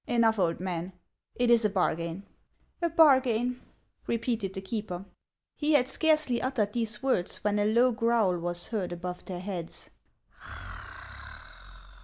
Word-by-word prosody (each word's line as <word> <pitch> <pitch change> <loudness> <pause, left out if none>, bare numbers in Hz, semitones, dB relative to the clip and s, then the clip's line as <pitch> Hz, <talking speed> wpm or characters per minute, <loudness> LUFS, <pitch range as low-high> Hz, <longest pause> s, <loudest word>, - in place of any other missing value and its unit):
" - - -40
Enough, 225 -2 +3
old 170 -3 +1
man; 180 0 -4 0.4
it 245 -1 +2
is 235 -1 +5
a 210 - +3
bargain." 175 -1 -1 0.3
" - - -41
A 340 - +1
bargain," 255 -6 +4 0.5
repeated 230 -4 -2
the - - -3
keeper. 195 -2 -5 0.5
He 305 +1 0
had 255 -4 +4
scarcely 305 -3 +2
uttered 230 -6 -1
these 225 -1 0
words, 250 -10 +1
when 210 0 +1
a 205 - +2
low 235 +4 +4
growl 230 -6 +1
was 175 0 -1
heard 205 -6 -2
above 180 +1 -6
their 180 -2 -6
heads. 180 -4 -5
215 Hz, 145 wpm, -28 LUFS, 180-245 Hz, 0.5 s, is